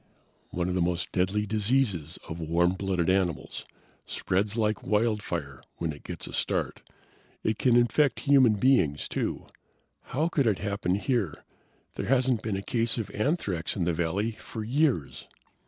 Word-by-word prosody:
"One 90 0 -2
of 90 - -1
the 90 - +1
most 85 0 -1
deadly 95 +3 +1
diseases 105 - 0
of 80 +1 -6
warm 85 +2 +2
blooded 95 -3 -1
animals. 95 -5 0 0.4
Spreads 100 +4 -1
like 110 -1 +1
wildfire 105 - -1 0.2
when 80 -2 -2
it 70 - -12
gets - - -6
a - - -8
start. - - -1 0.6
It 110 -1 0
can 125 -2 +4
infect 120 +3 +3
human 135 -6 +5
beings, 100 - +2
too. - - -3 0.6
How 150 +6 0
could 145 -7 +1
it 105 -4 +2
happen 100 -3 -1
here? 105 - -1 0.5
There - - -4
hasn't 130 -2 +2
been 110 -3 -2
a 100 - -5
case 115 +2 0
of 115 - -3
anthrax 105 - -1
in 95 - 0
the 85 0 +1
valley 90 +7 0
for 110 0 -7
years!" 125 - 0
105 Hz, 155 wpm, -28 LUFS, 90-120 Hz, 0.6 s, human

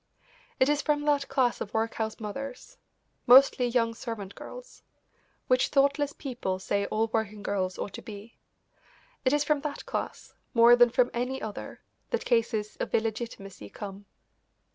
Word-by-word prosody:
It 260 - +5
is 295 0 +2
from 295 -1 0
that 285 -2 +2
class 260 -3 +1
of 205 - -5
workhouse 220 0 -1
mothers 270 - -7 0.5
mostly 255 0 +7
young 230 -1 +1
servant 225 -4 -6
girls - - -11 0.6
which 255 0 +3
thoughtless 280 +1 +2
people 245 -11 -4
say 200 +1 -1
all 220 +1 0
working 215 -2 -2
girls 185 -3 -1
ought 200 - -5
to - - -7
be; 215 +1 -11 0.9
it 255 - +4
is 295 0 +3
from 295 -1 +1
that 300 -1 -5
class - - -5 0.2
more 235 +1 +8
than 245 0 +6
from 245 +1 +2
any 250 +2 -2
other 215 -2 -7 0.3
that 475 - -2
cases 225 -3 0
of - - -2
illegitimacy 220 - -4
come. 200 - -9
235 Hz, 150 wpm, -28 LUFS, 215-275 Hz, 0.9 s, more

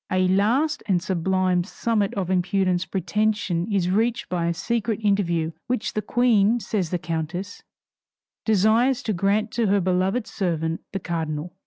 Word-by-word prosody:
A 185 0 +2
last 245 +11 +2
and 190 -4 +3
sublime 185 0 0
summit 210 +1 -1
of 190 -2 -2
impudent 185 0 +1
pretension 200 0 -1
is 185 -3 +1
reached 225 +4 0
by 175 -2 -1
a 170 - +1
secret 230 +1 -1
interview 170 -6 +1 0.2
which 250 -3 -1
the 215 - -1
Queen, 230 0 +3
says 200 -6 -2
the 180 - -1
countess, 165 +4 -4 0.8
desires 225 +5 +3
to 215 - -1
grant 200 +4 +1
to 235 -2 0
her 200 +1 +3
beloved 185 +5 0
servant 165 -4 -2
the 195 - -3
cardinal. 165 -1 -4
195 Hz, 150 wpm, -24 LUFS, 175-215 Hz, 0.8 s, and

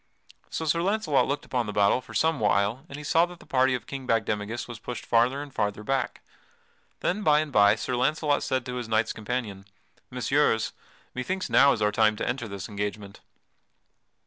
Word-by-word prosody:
So 160 - -3
Sir 170 +2 +1
Launcelot 190 -6 +1
looked 140 +1 -2
upon 125 -4 -1
the - - -3
battle 100 +5 +3
for - - -13
some 160 0 +2
while 105 +6 +1
and 140 - -7
he 150 - -8
saw 165 +4 +3
that 175 -1 -12
the - - -16
party 130 -3 +2
of 115 -3 -6
King 135 -2 -7
Bagdemagus 110 0 -1
was 120 -2 -8
pushed 125 - -6
farther 125 +5 +2
and 145 -2 -12
farther 105 -2 -2
back. 135 +3 -2 0.8
Then 205 +4 0
by 150 -6 +4
and 155 -1 -2
by 105 -3 +5
Sir 125 +3 -3
Launcelot 145 +3 +1
said 130 -2 -1
to 125 0 -4
his 120 -2 -5
knights 110 0 +1
companion: 110 -3 -4 0.5
"Messires, 125 -2 +1 0.4
methinks 185 +9 -3
now 140 +1 +6
is 110 - 0
our 105 - +3
time 110 0 +3
to - - -3
enter 120 -1 -2
this 100 -3 -6
engagement." 100 -1 -5
125 Hz, 195 wpm, -26 LUFS, 105-145 Hz, 0.8 s, now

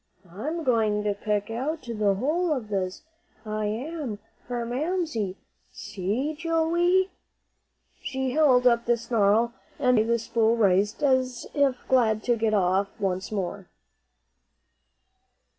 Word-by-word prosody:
"I'm 305 - -4
going 220 -5 +2
to 205 -1 +1
pick 205 +1 -2
out 290 +7 -3
the 215 -4 0
whole 315 - 0
of 250 -8 -2
this, 190 +1 -3 0.4
I 215 0 -2
am, 255 +1 -4 0.3
for 240 -1 -3
Mamsie. 255 - -2 0.3
See, 210 +8 -3
Joey!" 340 +3 +1 0.9
She 265 -1 -2
held 260 -4 +4
up 235 -1 +4
the 240 0 +3
snarl, 230 0 +2 0.2
and 250 -3 +3
away 220 - +1
the 235 0 +2
spool 230 0 +1
raced, 205 +3 +2
as 260 -3 +1
if 280 -3 +2
glad 220 -4 +2
to 240 - +2
get 220 -1 +1
off 190 +1 +2
once 185 0 -2
more. 195 -2 -4
235 Hz, 125 wpm, -26 LUFS, 210-275 Hz, 0.9 s, held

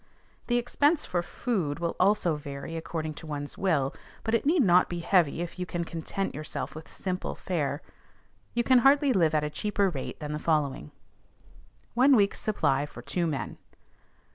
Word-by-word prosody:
The 240 - +2
expense 290 +6 +2
for 175 - 0
food 175 -5 -2
will 170 0 -2
also 185 -4 +3
vary 145 +2 -6
according 160 -1 -4
to 160 - -10
one's 145 -1 -4
will; 150 -8 +1 0.3
but 220 - -2
it 230 +4 +2
need 320 -2 +4
not 180 -2 +5
be 175 -1 -3
heavy 170 -3 +2
if 175 +1 -8
you 180 - -3
can 175 -1 -2
content 170 +4 -3
yourself 155 +1 -5
with 155 +1 -10
simple 185 -1 -3
fare. 150 -5 -2 0.7
You 235 - +2
can 255 +1 +5
hardly 275 +2 +5
live 165 -6 +3
at 150 - +2
a 150 - -1
cheaper 200 +4 0
rate 135 -5 -5
than 150 -1 -5
the 150 - -3
following: 145 - 0 1.0
ONE 260 +3 +6
WEEK'S 200 -3 +3
SUPPLY 145 -9 +1
FOR 125 -4 -11
TWO 175 +4 -1
MEN. 145 -4 -3
170 Hz, 175 wpm, -28 LUFS, 150-210 Hz, 1.0 s, ONE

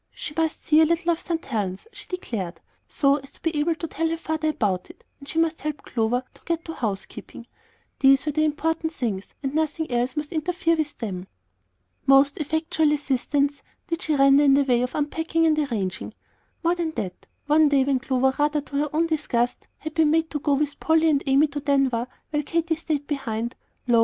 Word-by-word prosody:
She 300 - -6
must 320 -1 -1
see 310 0 +5
a - - +6
little 335 +2 +1
of 335 - -1
St. 330 -2 -3
Helen's, 200 - -3
she - - -11
declared, 220 - -4 0.3
so 280 -1 +2
as 275 -1 -12
to - - -17
be 330 -1 0
able 325 +2 +1
to 330 - -5
tell 325 +2 -1
her 330 - -1
father 315 -1 -1
about 205 -11 -1
it, - - -15 0.2
and 280 0 -12
she - - -5
must 325 0 +1
help 300 -1 -4
Clover 240 +2 0
to - - -20
get 335 -1 -2
to 325 - -5
housekeeping, 220 0 -5 0.5
these 270 +1 +5
were 300 - 0
the 310 +2 +1
important 320 +1 0
things, 210 -9 -4
and 270 0 -2
nothing 315 -1 -1
else 245 +4 0
must 300 -1 -3
interfere 335 +1 +1
with 305 -2 -3
them. 190 -5 -5 0.8
Most 275 +2 +5
effectual 315 0 +1
assistance 285 0 0 0.3
did 335 +1 -2
she 310 -4 +1
render 275 +1 +6
in 275 -1 +6
the 280 - +4
way 245 -3 +2
of 250 +1 -2
unpacking 325 +2 0
and 310 -1 +3
arranging. 215 -10 -3 0.5
More 340 +1 +3
than 340 -3 -2
that, 185 -9 -5 0.2
one 300 +1 +5
day, 280 -2 +4
when 270 -1 +1
Clover, 265 0 +1
rather 295 0 +2
to 285 0 -6
her 295 +1 +1
own 320 +2 +2
disgust, 250 -7 -1
had 315 0 -7
been 320 -2 +3
made 320 +1 +1
to 295 - -2
go 285 0 +2
with 290 0 -1
Polly 320 0 +3
and 280 -2 +2
Amy 275 +3 +5
to 290 +1 -4
Denver 275 -4 +1 0.2
while 295 -1 +1
Katy 330 +2 0
stayed 305 -2 -3
behind, 235 -5 -3 0.3
lo! 235 -2 +5
295 Hz, 205 wpm, -24 LUFS, 265-320 Hz, 0.8 s, a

